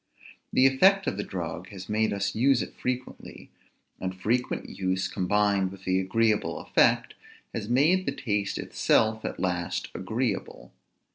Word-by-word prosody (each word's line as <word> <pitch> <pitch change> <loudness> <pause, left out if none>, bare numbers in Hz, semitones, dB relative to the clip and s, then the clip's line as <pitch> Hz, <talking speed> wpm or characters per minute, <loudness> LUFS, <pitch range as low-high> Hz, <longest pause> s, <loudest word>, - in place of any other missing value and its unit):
The 130 - +4
effect 190 +9 +5
of - - -2
the 105 - -2
drug 90 -1 -5
has 95 -2 -9
made 110 +1 +1
us 100 0 -1
use 130 +2 +3
it - - -9
frequently; 125 0 -6 0.5
and 95 0 -4
frequent 120 +6 -1
use, 95 0 -1
combined 100 0 +1
with 95 -1 -12
the 95 0 +1
agreeable 110 +3 +1
effect, - - +2 0.4
has 110 -1 -4
made 160 +10 +3
the - - +2
taste 105 -7 -2
itself 110 0 +1
at - - -4
last 90 -2 -2
agreeable. 110 +3 -3
105 Hz, 145 wpm, -27 LUFS, 95-125 Hz, 0.5 s, effect